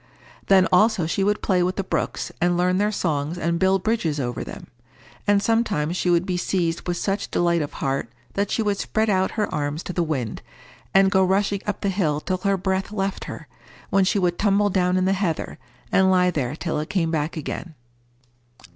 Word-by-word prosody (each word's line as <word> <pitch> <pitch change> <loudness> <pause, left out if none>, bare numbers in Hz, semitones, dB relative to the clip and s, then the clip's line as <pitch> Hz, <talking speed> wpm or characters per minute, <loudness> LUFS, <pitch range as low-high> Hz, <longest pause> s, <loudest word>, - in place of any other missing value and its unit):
Then 190 -1 +5
also 210 -1 +4
she 180 +4 0
would 205 +1 0
play 185 -3 +2
with 180 +1 0
the 195 - -2
brooks, - - -2
and 175 0 +2
learn 180 +1 +2
their 210 +1 +2
songs, 155 -4 -1
and 170 0 -1
build 190 0 +2
bridges 175 -10 0
over 120 -3 -3
them. - - -9 0.6
And 205 0 +3
sometimes 205 -9 +1
she 180 - 0
would 175 0 +3
be 180 -2 -1
seized 175 -2 -1
with 175 0 -1
such 195 +2 -2
delight 170 -1 +1
of 145 - -4
heart 135 -3 -2 0.2
that 200 0 -1
she 225 - 0
would 205 -2 0
spread 220 0 0
out 190 -1 +1
her 210 - +1
arms 145 +2 -2
to 180 - -5
the 175 - 0
wind, 135 -9 -2 0.5
and 195 0 +5
go 190 -1 +4
rushing 195 +1 +1
up 205 -1 -2
the 200 - 0
hill 165 -7 0
till 185 +4 -2
her 195 +1 0
breath 190 +1 -1
left 195 -2 -2
her, - - -8 0.4
when 195 0 +4
she 190 - +1
would 180 -2 0
tumble 205 0 +3
down 180 -1 +2
in 185 - +2
the 190 - +3
heather, 185 -5 -2 0.3
and 190 -1 +4
lie 180 -1 +4
there 140 -4 -2
till 160 -2 -2
it 155 - -4
came 175 -5 0
back 155 0 -2
again. 160 +2 -5
185 Hz, 210 wpm, -23 LUFS, 170-195 Hz, 0.6 s, Then